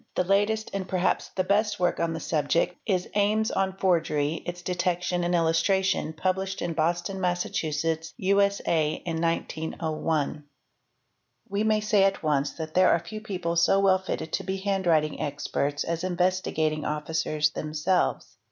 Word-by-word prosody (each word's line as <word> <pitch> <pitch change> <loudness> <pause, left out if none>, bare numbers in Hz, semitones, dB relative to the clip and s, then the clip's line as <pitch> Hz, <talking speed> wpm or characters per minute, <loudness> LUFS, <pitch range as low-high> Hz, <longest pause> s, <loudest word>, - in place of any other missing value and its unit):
The - - +2
latest 205 +4 +1
and 195 -1 -3
perhaps 185 0 0
the 185 - +1
best 205 +2 +1
work 180 -1 +1
on 170 -1 0
the 160 - -4
subject 160 +3 0
is 185 -4 0
'' - - -30
Ames 210 +2 +2
on 190 0 -1
Forgery, 160 -4 +1
its 175 0 -5
Detection 180 0 -1
and 175 +1 +1
Illustration," 165 +1 +1
wublished 190 +1 -1
at 165 - -4
Boston, 175 +4 -1
Mass., 175 -1 0
U.S.A. 165 +2 0
in 165 -1 -2
1901. 160 -2 -1
i? - - -17 1.1
We 200 +2 -1
may 215 -1 +2
say 210 -2 +3
at 195 -2 +1
once 145 -2 +1
that 160 -1 -6
there 185 0 +5
are - - +5
few 170 +6 -8
people 180 -5 -3
so 195 +3 +4
well 190 -1 +4
fitted 160 -4 -5
to - - 0
be 190 +1 -2
handwriting 185 -6 +1
experts 145 -1 -2
as 170 0 -3
Investigating 180 -4 0
Officers 150 0 0
themselves. 155 +5 -1
175 Hz, 155 wpm, -26 LUFS, 160-195 Hz, 1.1 s, there